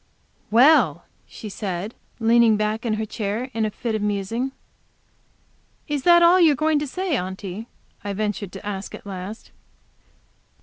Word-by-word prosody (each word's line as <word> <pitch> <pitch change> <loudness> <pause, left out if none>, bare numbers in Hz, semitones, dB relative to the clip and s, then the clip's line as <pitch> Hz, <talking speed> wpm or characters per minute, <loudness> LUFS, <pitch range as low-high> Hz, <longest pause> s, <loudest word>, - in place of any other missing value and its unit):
"Well!" 230 - +5 0.2
she 220 - -9
said, 195 0 -4 0.2
and 225 - -3
leaned 230 -2 +5
back 215 +3 -1
in 215 - +1
her 220 0 -2
chair 215 +4 -3
in 225 -1 0
a - - 0
fit 225 +2 -4
of 215 - -1
musing. 210 +5 -1 1.4
"Is 295 -2 -1
that 345 -1 +7
all 350 +2 +6
you 325 -4 +6
are - - -2
going 310 +2 +2
to 295 - -3
say, 365 +2 -2
Aunty?" 190 +2 -5 0.4
I 205 - -3
ventured 205 -2 -3
to 195 +1 -9
ask 200 -1 -5
at - - -13
last. 195 +2 -7
220 Hz, 165 wpm, -23 LUFS, 200-260 Hz, 1.4 s, that